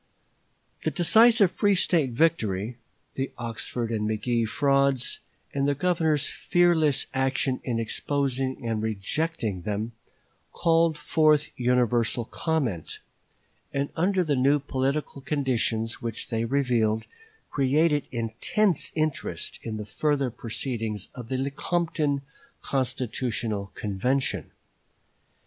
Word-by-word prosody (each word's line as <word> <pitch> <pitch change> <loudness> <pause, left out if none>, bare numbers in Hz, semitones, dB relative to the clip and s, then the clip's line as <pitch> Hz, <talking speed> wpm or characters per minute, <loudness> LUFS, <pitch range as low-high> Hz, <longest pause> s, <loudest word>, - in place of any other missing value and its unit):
The - - +2
decisive 220 +2 +5
free 205 -1 +2
State 165 -6 +3
victory, 115 - +1 0.4
the 135 0 -3
Oxford 115 0 -3
and 105 -1 -1
McGee 115 +1 0
frauds, 140 0 +2 0.3
and 140 0 +1
the 145 - +2
Governor's 160 -2 +1
fearless 160 -5 +2
action 135 0 0
in 120 -3 -1
exposing 130 +1 -1
and 110 -2 -1
rejecting 110 - -2
them, 105 +3 -3 0.6
called 165 -1 +3
forth 150 -1 +3
universal 120 -2 +2
comment; 130 - -2 0.7
and 140 +1 -1
under 185 +2 +2
the 150 -4 +1
new 135 +3 +4
political 140 +1 -2
conditions 120 -5 -1
which 115 +5 -4
they 115 -1 0
revealed, 115 -4 +1 0.5
created 145 +2 +2
intense 125 - 0
interest 155 -3 -2
in 110 -2 -4
the 105 - -5
further 135 +5 0
proceedings 115 -3 -4
of 120 -3 -9
the 130 - -1
Lecompton 145 +1 -1 0.4
Constitutional 120 -5 -2
Convention. 125 +7 -1
135 Hz, 105 wpm, -26 LUFS, 115-150 Hz, 0.7 s, decisive